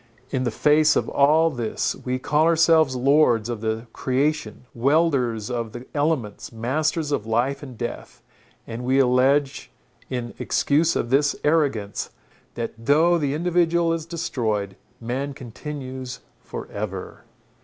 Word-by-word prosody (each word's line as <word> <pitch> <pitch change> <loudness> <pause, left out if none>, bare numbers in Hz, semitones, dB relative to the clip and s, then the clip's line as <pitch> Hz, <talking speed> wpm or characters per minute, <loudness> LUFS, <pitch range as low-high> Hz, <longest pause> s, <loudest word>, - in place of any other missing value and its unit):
In 130 -2 -1
the - - +1
face 150 +1 +3
of - - +1
all 155 +4 +4
this 120 -5 -2
we 125 0 -3
call 150 +4 +1
ourselves 160 -4 +4
lords 125 -4 +3
of 115 -3 -4
the 110 +1 -2
creation, 130 -3 -1
wielders 125 -4 +1
of 115 -3 -3
the 120 +1 -8
elements, 145 -8 -1
masters 150 +7 -1
of 110 -6 -1
life 125 +5 0
and 130 -5 -10
death, 120 0 -6 0.4
and 115 +1 -6
we 130 +2 +2
allege 135 +2 +2 0.4
in 120 -2 -4
excuse 155 +3 +2
of 120 - -2
this 145 +2 +3
arrogance, 140 -10 0 0.5
that 115 -1 -4
though 165 +6 +4
the 145 -2 -1
individual 170 0 +2
is 165 -1 -4
destroyed, 110 - -2 0.2
man 135 +4 -3
continues 130 0 -7 0.2
for - - -8
ever. 100 -2 -6
135 Hz, 135 wpm, -23 LUFS, 120-155 Hz, 0.5 s, all